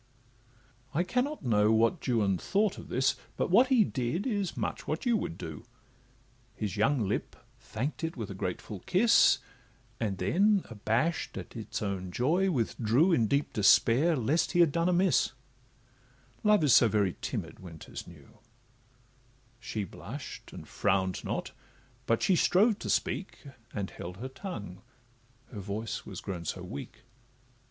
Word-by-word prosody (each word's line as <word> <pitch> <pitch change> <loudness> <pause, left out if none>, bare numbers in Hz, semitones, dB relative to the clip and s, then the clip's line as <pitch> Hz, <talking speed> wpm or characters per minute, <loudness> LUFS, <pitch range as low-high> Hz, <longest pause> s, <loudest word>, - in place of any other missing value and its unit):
I 170 - +3
cannot 250 - -2
know 105 -2 +3
what 115 +9 +2
Juan 105 -7 +2
thought 205 0 0
of - - -10
this, 130 +2 +2 0.2
But - - -1
what 240 +7 +6
he 255 -5 +5
did, 130 +2 -2
is 205 -8 -2
much - - -3
what 155 - -2
you 240 -2 +3
would 85 - -3
do; 80 -2 -7 0.9
His 105 -3 -3
young 110 +1 +2
lip 100 - -2 0.2
thank'd 115 +7 -4
it 160 -2 -3
with 110 -4 -5
a - - -4
grateful 95 +2 -5
kiss, 225 +6 +5 0.6
And 105 -4 -1
then, 195 - +3
abash'd 115 +10 -1
at - - -8
its 110 -1 -5
own 95 -3 -3
joy, 170 - +2
withdrew 125 - +2
In 115 -7 +3
deep 140 +6 0
despair, 120 - +4
lest 140 +6 +1
he 175 - +5
had 165 -4 +5
done 170 +4 +1
amiss,— 180 - +3 1.1
Love 210 -5 +4
is 145 - +5
so 120 - +7
very 100 -4 +1
timid - - -4
when 85 -3 -10
'tis - - -9
new: 85 +5 -16 1.2
She 110 -2 -4
blush'd, 105 - -8
and - - -10
frown'd 95 -1 0
not, - - -3 0.6
but 115 - +2
she 190 - +4
strove 205 +5 +3
to - - -5
speak, 190 - -1 0.3
And 100 -2 -4
held 90 +2 -8
her 130 +5 -6
tongue, 105 - -7 0.7
her 110 - -7
voice 105 +3 -5
was - - -7
grown 90 -3 -5
so - - -4
weak. 70 - -8
120 Hz, 155 wpm, -30 LUFS, -, 1.2 s, so